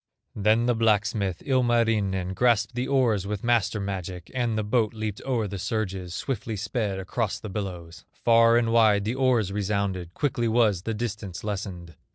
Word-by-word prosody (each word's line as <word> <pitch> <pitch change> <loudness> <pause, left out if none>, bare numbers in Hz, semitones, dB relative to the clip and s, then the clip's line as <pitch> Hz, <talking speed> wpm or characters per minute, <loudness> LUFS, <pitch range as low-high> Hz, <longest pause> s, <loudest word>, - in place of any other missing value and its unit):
Then 110 +3 +3
the 120 - +3
blacksmith, 105 -4 +1
Ilmarinen, 115 -8 +1
Grasped 115 +1 +2
the 125 +1 -2
oars 120 -8 +2
with 105 -1 -4
master 115 -3 +1
magic, 95 -3 -5
And 120 -4 0
the 110 - 0
boat 110 +1 +1
leaped 110 -2 -4
o'er 120 -5 0
the 100 -1 -6
surges, 95 -4 -3
Swiftly 115 -4 -3
sped 105 0 -2
across 95 +3 -2
the 110 - -7
billows; 90 -4 -6
Far 115 0 +4
and 115 -1 +1
wide 105 -3 +4
the 110 - 0
oars 125 -7 +2
resounded, 100 -3 -2
Quickly 120 -5 0
was 110 -5 +2
the 110 +3 -3
distance 105 -5 -5
lessened. 95 -5 -5
105 Hz, 165 wpm, -26 LUFS, 95-115 Hz, -, Far